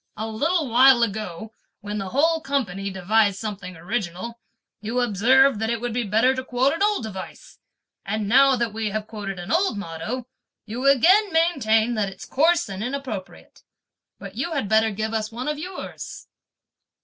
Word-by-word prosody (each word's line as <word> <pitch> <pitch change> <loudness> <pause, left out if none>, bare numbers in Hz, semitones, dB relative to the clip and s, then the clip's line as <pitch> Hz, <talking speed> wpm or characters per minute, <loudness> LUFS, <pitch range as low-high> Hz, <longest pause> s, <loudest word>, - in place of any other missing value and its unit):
"A 220 - -3
little 300 +8 0
while 250 +1 +6
ago, 215 -1 -4 0.3
when 210 +1 -4
the 195 -1 -4
whole 320 - +2
company 210 - -2
devised 200 +2 +1
something 195 -4 -6
original, 200 +4 -4 0.4
you 225 +4 -2
observed 245 +3 +4
that 225 0 -1
it 235 -1 -1
would 240 0 -3
be 245 - 0
better 225 +4 +2
to 260 0 -4
quote 255 +2 +1
an 330 - -5
old 415 - +2
device; 190 -4 -9 0.4
and 215 -1 -2
now 270 +4 +5
that 235 -3 -2
we 220 -1 -2
have 215 +1 -3
quoted 205 -3 -6
an 175 +3 -6
old 340 - +2
motto, 200 +7 -5 0.4
you 240 +5 -3
again 370 - +5
maintain 245 -9 +2
that 210 -3 -1
it's 190 - -11
coarse 330 +5 +2
and 195 +1 -5
inappropriate! 250 -7 -6 0.6
But - - -9
you 340 - -3
had 275 -9 -1
better 220 +1 +3
give 220 +2 -3
us 215 0 -2
one 245 +4 -5
of 300 0 -2
yours." 365 +4 -7
225 Hz, 175 wpm, -23 LUFS, 205-270 Hz, 0.6 s, while